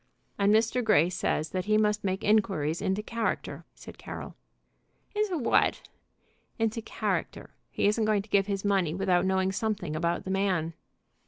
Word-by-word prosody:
"And 200 0 +4
Mr. 225 +3 +2
Grey 180 -6 +4
says 160 -3 -1
that 185 -1 -2
he 215 0 +3
must 210 -1 +1
make 190 +2 -2
inquiries 190 -7 +1
into 190 +3 -1
character," 230 +1 -3
said - - -12
Carroll. - - -8 0.8
"Into 415 -4 0
what?" 245 - +1 0.7
"Into 225 0 -1
character. - - -3 0.2
He - - -1
isn't 210 +2 +2
going 210 -2 +2
to 215 - -19
give 200 0 +3
his 200 -1 -2
money 190 -6 +1
without 185 -1 +2
knowing 190 0 +1
something 200 -6 -2
about 170 +2 -1
the 190 - -4
man." 185 -4 0
200 Hz, 160 wpm, -28 LUFS, 185-215 Hz, 0.8 s, And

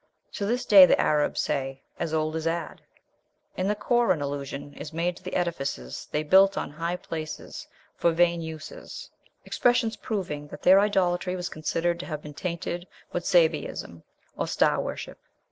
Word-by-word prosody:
To 200 - -2
this 245 +3 0
day 195 -3 +9
the - - +3
Arabs 150 -1 +2
say 135 -2 -3 0.2
"as 160 - -2
old 155 0 0
as 160 0 -2
Ad." 165 0 -3 0.7
In 185 - -1
the 210 - +1
Koran 240 -5 +2
allusion 145 0 -5
is 150 - -8
made 170 +2 -1
to - - -16
the 185 - -5
edifices 135 - -3
they 150 - 0
built 195 +5 +5
on - - -3
"high 165 +3 -2
places 155 -3 -7 0.3
for 170 - +3
vain 170 0 +2
uses;" 160 -1 -8 0.3
expressions 240 -2 +2
proving 175 -9 -4
that - - -11
their 190 +2 +7
"idolatry 185 -3 +1
was 180 -1 -3
considered 165 +2 -1
to - - -6
have 150 -2 -5
been 150 - -9
tainted 175 +2 -4 0.3
with 175 0 -2
Sabæism 160 - +1 0.3
or - - -2
star - - +2
worship." - - -6
170 Hz, 165 wpm, -26 LUFS, 150-185 Hz, 0.7 s, day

